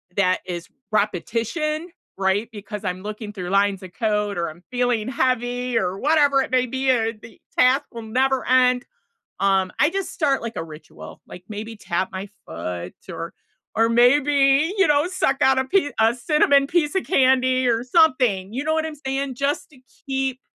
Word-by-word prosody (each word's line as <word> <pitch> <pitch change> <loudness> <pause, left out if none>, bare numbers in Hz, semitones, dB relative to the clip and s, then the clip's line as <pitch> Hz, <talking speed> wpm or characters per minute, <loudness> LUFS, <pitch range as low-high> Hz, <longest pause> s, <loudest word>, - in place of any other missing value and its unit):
that 185 -2 +2
is 175 -2 -6 0.2
repetition, 230 - -1 0.3
right, 195 +3 +1
because 210 0 -7
I'm 185 0 -3
looking 210 0 -6
through 180 -3 -6
lines 195 0 +1
of 185 - -10
code, 210 -3 -1
or 170 -1 -1
I'm 165 +3 -14
feeling 245 -2 0
heavy, 245 -1 0
or 185 -3 -1
whatever 285 -1 +3
it - - -4
may 255 -1 +3
be, 260 +2 -2
or 225 -3 +2
the 225 +1 -15 0.2
task 260 +3 +5
will 235 - -7
never 260 +4 0
end 250 -1 +3 0.5
um, 190 -1 +2
I 295 - +4
just 390 +2 -3
start 285 -5 0
like 230 -1 -6
a - - -2
ritual, 155 -1 -12
like 180 - -11
maybe 215 +2 -6
tap 185 -2 -2
my 190 +1 -6 0.2
foot 85 +2 -6 0.2
or - - -6 0.4
or 225 0 +4
maybe, 275 +5 +4
you 390 - +4
know, 295 +1 +3
suck 280 -7 0
out 265 0 +4
a 260 - 0
pie 290 +1 +1
a 225 +2 +4
cinnamon 280 +2 +3
piece 315 +1 0
of 380 - 0
candy 255 -4 +3
or 230 0 +1
something, 250 - +3
you 270 +4 -3
know 315 - +1
what 320 0 0
I'm 315 -1 -6
saying? 270 0 -2
Just 280 +3 -2
to 275 - -20 0.3
keep 265 -1 -2
245 Hz, 180 wpm, -22 LUFS, 205-275 Hz, 0.5 s, task